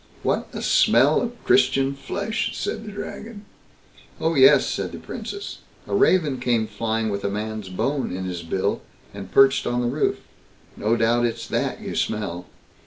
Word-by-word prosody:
"What - - 0
a - - -6
smell 135 +6 +4
of 240 -1 -5
Christian 135 +1 +3
flesh", 200 - -3
said 220 - -3
the 210 - -7
Dragon. 205 +1 -8 0.7
"Oh, 165 +1 +1
yes", 135 -3 +6
said - - -3
the - - -6
Princess, 405 0 -7 0.3
"a - - -6
raven 180 -9 +3
came 120 -3 +1
flying 110 +1 -2
with 100 -1 -3
a 100 - 0
man's 105 -1 -4
bone 135 +9 -1
in 95 0 -4
his 90 -2 -4
bill, 85 +3 -1 0.3
and 100 -2 -8
perched 135 0 +5
on 120 - 0
the - - -1
roof. 140 +5 0 0.6
No 115 +3 +1
doubt 120 +1 +3
it's 115 - -5
that - - -1
you - - -5
smell." 90 -5 -2
120 Hz, 170 wpm, -23 LUFS, 105-155 Hz, 0.7 s, yes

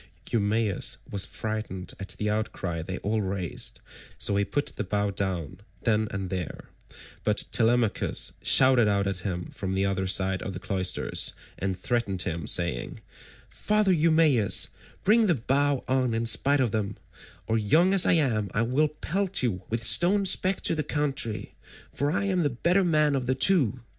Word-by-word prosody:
Eumaeus 105 -2 0
was 100 -2 0
frightened 110 -4 -5
at 100 - -8
the 105 - -2
outcry 105 -6 -2
they 95 +3 -5
all 110 +1 0
raised, 95 -3 -3 0.4
so 100 - 0
he 100 - +2
put 145 +7 -2
the - - -3
bow 100 +1 -1
down 90 -3 -3 0.2
then 110 -2 +1
and 95 -2 -5
there, 90 -4 -5 0.5
but 105 -1 0
Telemachus 115 -1 +2
shouted 130 -4 +5
out 100 -1 +1
at 95 -1 -2
him 90 -2 -5
from 95 -1 -4
the 95 +1 +1
other 95 -1 -1
side 95 0 +1
of 95 - -5
the 90 - -6
cloisters, 95 -1 -1 0.3
and 95 0 -2
threatened 100 -4 -1
him 85 -2 -4
saying, 85 -9 0 0.5
"Father 210 -2 +1
Eumaeus, 155 - +3 0.3
bring 220 +2 +4
the 175 - +3
bow 140 +3 +1
on 130 -3 +1
in 115 +1 -1
spite 140 +5 +2
of 125 -5 +1
them, 105 -2 -2 0.5
or 110 0 0
young 160 - +3
as 190 -2 +4
I - - +5
am 120 - +1
I 110 - +2
will 130 +6 +2
pelt 180 +4 -2
you 100 -7 -1
with 115 0 -1
stones 190 - +4
back 185 +1 -2
to - - +1
the 155 - 0
country, 140 -8 -2 0.4
for 145 +1 -1
I 185 - 0
am 190 -2 0
the 150 -4 +2
better 175 +10 +1
man 150 -4 +3
of 130 -2 -2
the 130 - +1
two. 130 - +3
110 Hz, 175 wpm, -26 LUFS, 95-145 Hz, 0.5 s, shouted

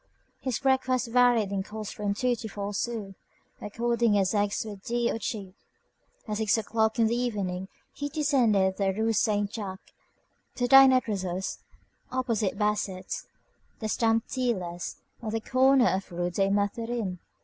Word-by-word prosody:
His 260 -4 -2
breakfast 260 -2 +1
varied 240 -4 +4
in 195 -1 -1
cost 210 +1 -6
from 205 -1 -2
two 250 +3 +1
to 225 - -6
four 200 0 -5
sous, 210 -2 -3 0.5
according 235 0 +1
as 195 0 +2
eggs 205 +1 0
were 210 -2 -7
dear 235 +4 -1
or - - -4
cheap. 200 -5 -5 0.7
At 210 -1 -2
six 220 0 +2
o'clock 220 0 0
in 230 - +4
the 225 +2 +1
evening 200 -7 -2 0.3
he 285 0 -4
descended 235 -11 +2
the 195 -1 +1
Rue 220 +3 0
Saint 205 -1 +1
Jacques 195 -4 -7 0.6
to 245 - 0
dine 270 +1 +9
at 255 -1 +2
Rousseau's, 190 -3 -3 0.5
opposite 230 -6 -1
Basset's, 210 -3 -2 0.5
the 220 - -4
stamp 225 +1 +1
dealer's, 185 -10 -2 0.3
on 225 - -4
the 225 - 0
corner 260 +2 +4
of 190 0 -2
the 175 - -10
Rue 175 0 -1
des 195 +2 +1
Mathurins. 205 -1 -1
220 Hz, 160 wpm, -28 LUFS, 195-240 Hz, 0.7 s, dine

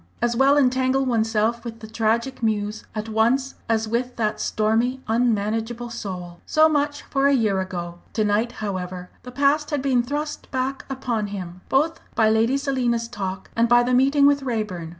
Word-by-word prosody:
As 240 0 0
well 270 +3 +4
entangle 260 0 +2
oneself 225 -1 +1
with 230 -2 -7
the - - -9
Tragic 225 +4 -1
Muse 215 -1 -1
at 215 0 -3
once 235 +5 +1 0.2
as 225 -1 +1
with 245 +3 -2
that 215 -2 -1
stormy, 225 +4 +1
unmanageable 225 +1 0
soul! 180 -6 -6
So 310 0 +5
much 290 -1 0
for 275 0 +1
a 280 - +4
year 210 -6 +1
ago. 175 -2 -5
To 215 - +1
night, 215 +4 +1
however, 185 -3 -5
the 250 - -10
past 285 +3 +2
had 290 -4 -1
been 260 -3 +3
thrust 295 +5 -4
back 265 0 -2
upon 240 -5 -2
him, 185 -3 -7
both 310 +5 +2 0.2
by 220 -1 +4
Lady 225 +5 +3
Selina's 250 -4 0
talk 195 -5 -5
and 230 0 +2
by 240 0 +6
the 250 +1 0
meeting 275 +3 +4
with 285 0 +4
Raeburn. 210 -10 -3
235 Hz, 175 wpm, -23 LUFS, 215-265 Hz, 0.2 s, by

